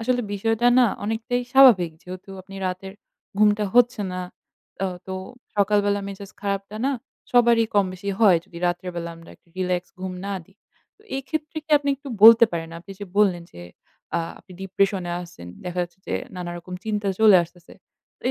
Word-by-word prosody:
আসলে 245 Hz, +2 st, +1 dB
বিষয়টা 225 Hz, +3 st, +1 dB
না 250 Hz, -, +6 dB, 0.2 s
অনেকটাই 225 Hz, +3 st, -1 dB
স্বাভাবিক। 245 Hz, -11 st, +7 dB
যেহেতু 185 Hz, +2 st, -9 dB
আপনি 195 Hz, +1 st, -13 dB
রাতের 185 Hz, +1 st, -5 dB, 0.5 s
ঘুমটা 210 Hz, 0 st, +4 dB
হচ্ছে 245 Hz, -2 st, +4 dB
না 185 Hz, -, -3 dB, 0.6 s
আ -, -, +1 dB, 0.2 s
তো 190 Hz, -, -4 dB, 0.4 s
সকালবেলা 205 Hz, 0 st, +2 dB
মেজাজ 200 Hz, 0 st, -8 dB
খারাপটা 200 Hz, +1 st, -3 dB
না 280 Hz, -, +1 dB, 0.4 s
সবারই 235 Hz, -2 st, +5 dB
কম 200 Hz, -1 st, +5 dB
বেশি 200 Hz, +2 st, -5 dB
হয় 195 Hz, -5 st, +7 dB
যদি 170 Hz, -, -11 dB
রাত্রেবেলা 175 Hz, -1 st, -3 dB
আমরা 165 Hz, 0 st, -14 dB
একটু -, -, -35 dB
relax 180 Hz, -1 st, 0 dB, 0.2 s
ঘুম 185 Hz, 0 st, -4 dB
না 200 Hz, -, -2 dB
দিই। 195 Hz, +4 st, -26 dB, 0.4 s
তো -, -, -32 dB, 0.2 s
এই 270 Hz, -, -3 dB
ক্ষেত্রে 315 Hz, 0 st, -4 dB
কি 315 Hz, -, -21 dB
আপনি 285 Hz, -, -4 dB
একটু 280 Hz, +1 st, -11 dB
বলতে 230 Hz, +1 st, +10 dB
পারেন, 165 Hz, -1 st, -4 dB
আপনি 175 Hz, +3 st, -11 dB
যে -, -, -4 dB
বললেন 190 Hz, -5 st, +3 dB
যে 85 Hz, -, -11 dB, 0.6 s
আ -, -, +2 dB, 0.2 s
আপনি 185 Hz, -, -16 dB
depression 195 Hz, 0 st, 0 dB
এ -, -, -2 dB
আছেন, 90 Hz, -, -11 dB, 0.2 s
দেখা 180 Hz, 0 st, -4 dB
যাচ্ছে 175 Hz, +1 st, -8 dB
যে -, -, -2 dB, 0.2 s
নানারকম 175 Hz, 0 st, -6 dB
চিন্তা 210 Hz, -2 st, -1 dB
চলে 215 Hz, -3 st, +8 dB
আসতেছে। 175 Hz, +1 st, -18 dB, 0.5 s
তো -, -, -21 dB
200 Hz, 175 wpm, -23 LUFS, 180-225 Hz, 0.6 s, বলতে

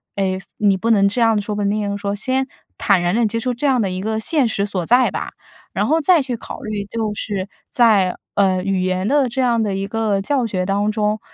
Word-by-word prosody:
诶， 190 Hz, -1 st, -1 dB, 0.2 s
你 205 Hz, -2 st, +3 dB
不 225 Hz, +5 st, 0 dB
能 200 Hz, -3 st, +4 dB
这 205 Hz, +5 st, -1 dB
样 225 Hz, -2 st, +3 dB
说、 210 Hz, +1 st, -4 dB
不 205 Hz, -, -2 dB
能 200 Hz, -, +1 dB
那 210 Hz, +1 st, 0 dB
样 200 Hz, -1 st, -2 dB
说， 200 Hz, 0 st, -3 dB
先 260 Hz, +6 st, -1 dB, 0.3 s
坦 195 Hz, -3 st, +2 dB
然 175 Hz, +2 st, 0 dB
地 235 Hz, 0 st, +2 dB
接 225 Hz, +2 st, -1 dB
受 250 Hz, +2 st, -1 dB
这 250 Hz, +5 st, -4 dB
样 260 Hz, -4 st, +3 dB
的 200 Hz, -, 0 dB
一 185 Hz, 0 st, -4 dB
个 220 Hz, +2 st, -2 dB
现 275 Hz, +3 st, +2 dB
实 200 Hz, -2 st, -1 dB
所 190 Hz, -4 st, -2 dB
在 245 Hz, +6 st, +4 dB
吧。 -, -, -5 dB, 0.4 s
然 -, -, 0 dB
后 320 Hz, +2 st, +3 dB
再 335 Hz, +1 st, +4 dB
去 255 Hz, -3 st, -4 dB
考 -, -, -8 dB
虑， 210 Hz, -2 st, -4 dB
就 220 Hz, +1 st, -3 dB
是 200 Hz, -2 st, -4 dB, 0.2 s
在， 210 Hz, -7 st, +3 dB, 0.2 s
呃， 190 Hz, -2 st, +2 dB
语 195 Hz, -1 st, 0 dB
言 185 Hz, +1 st, -1 dB
的 280 Hz, +1 st, +3 dB
这 245 Hz, +2 st, -2 dB
样 235 Hz, -3 st, +2 dB
的 205 Hz, -2 st, -1 dB
一 195 Hz, +1 st, -3 dB
个 215 Hz, -2 st, 0 dB
教 265 Hz, +3 st, 0 dB
学 185 Hz, -4 st, -2 dB
当 205 Hz, +2 st, +1 dB
中， 210 Hz, 0 st, 0 dB
210 Hz, 265 characters per minute, -19 LUFS, 195-235 Hz, 0.4 s, 能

